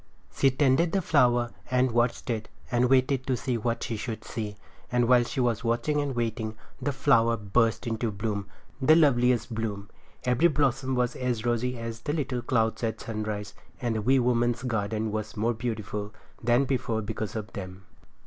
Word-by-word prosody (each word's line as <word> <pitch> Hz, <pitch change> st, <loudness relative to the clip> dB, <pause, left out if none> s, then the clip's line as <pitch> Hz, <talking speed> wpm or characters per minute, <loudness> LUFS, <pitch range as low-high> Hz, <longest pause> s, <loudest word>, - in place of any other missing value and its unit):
She 135 Hz, -, +4 dB
tended 140 Hz, +5 st, +2 dB
the 195 Hz, -, +2 dB
flower 120 Hz, -6 st, +3 dB, 0.2 s
and 125 Hz, 0 st, +2 dB
watched 120 Hz, +1 st, 0 dB
it 110 Hz, -2 st, -3 dB, 0.2 s
and 120 Hz, 0 st, +3 dB
waited 130 Hz, 0 st, +2 dB
to 130 Hz, -2 st, +1 dB
see 125 Hz, +1 st, -2 dB
what 115 Hz, +1 st, -1 dB
she 115 Hz, -, -3 dB
should 110 Hz, 0 st, -5 dB
see; 105 Hz, -3 st, -4 dB, 0.4 s
and 120 Hz, -1 st, +2 dB
while 125 Hz, -1 st, +6 dB
she 120 Hz, -, -4 dB
was 120 Hz, -3 st, +1 dB
watching 120 Hz, +6 st, +1 dB
and 140 Hz, -3 st, -2 dB
waiting, 115 Hz, -2 st, -2 dB, 0.3 s
the 145 Hz, -, 0 dB
flower 115 Hz, -4 st, +3 dB
burst 115 Hz, +2 st, +1 dB
into 115 Hz, 0 st, -1 dB
bloom. 100 Hz, -1 st, -3 dB, 0.3 s
The 155 Hz, +4 st, +6 dB
loveliest 125 Hz, -6 st, +3 dB
bloom! 105 Hz, -3 st, -4 dB, 0.3 s
Every 125 Hz, +7 st, +4 dB
blossom 135 Hz, -3 st, +1 dB
was 125 Hz, -1 st, 0 dB
as 125 Hz, -3 st, -2 dB
rosy 120 Hz, +1 st, 0 dB
as 115 Hz, 0 st, -5 dB
the 145 Hz, +5 st, -3 dB
little 135 Hz, -5 st, -2 dB
clouds 115 Hz, -1 st, 0 dB
at 110 Hz, -1 st, -1 dB
sunrise; 105 Hz, -2 st, -4 dB, 0.3 s
and 120 Hz, -2 st, -1 dB
the 110 Hz, -, -1 dB
wee 130 Hz, +5 st, +4 dB
woman's 120 Hz, -1 st, +1 dB
garden 110 Hz, -2 st, -1 dB
was 110 Hz, 0 st, -4 dB
more 115 Hz, +3 st, +1 dB
beautiful 110 Hz, -3 st, -4 dB, 0.3 s
than 120 Hz, +3 st, +3 dB
before 120 Hz, -4 st, -1 dB
because 110 Hz, 0 st, -4 dB
of 110 Hz, 0 st, -5 dB
them. 95 Hz, -2 st, -7 dB
120 Hz, 175 wpm, -27 LUFS, 110-125 Hz, 0.4 s, while